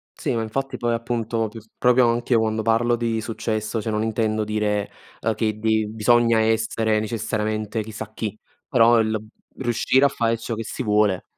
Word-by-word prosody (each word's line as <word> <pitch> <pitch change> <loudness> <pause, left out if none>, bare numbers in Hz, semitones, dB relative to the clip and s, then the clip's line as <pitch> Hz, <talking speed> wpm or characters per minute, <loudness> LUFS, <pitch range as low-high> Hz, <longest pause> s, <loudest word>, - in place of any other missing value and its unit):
Sì, - - -2
ma 115 - 0
infatti 135 +4 -3
poi 120 -1 0
appunto 115 -1 -1
più 110 +2 -9 0.2
proprio 125 0 +4
anche 120 +1 +1
quando 110 0 0
parlo 115 +2 +2
di 115 -1 -1
successo, 110 0 -3
cioè 110 - -3
non 105 0 0
intendo 110 -1 0
dire, 105 -1 -1 0.3
uhm, 110 0 +1
che 110 -1 -1
bi 110 0 +1
bisogna 115 +1 +3
essere 110 0 +1
necessariamente 110 0 -2
chissà 110 0 -7
chi, 110 -1 -4 0.3
però 115 -1 +5
il 110 0 +1 0.4
riuscire 130 +2 +2
a - - +7
fare 115 -2 0
ciò 115 +1 -5
che 115 - -4
si 130 - -5
vuole. 105 -3 +2
110 Hz, 175 wpm, -23 LUFS, 110-115 Hz, 0.4 s, a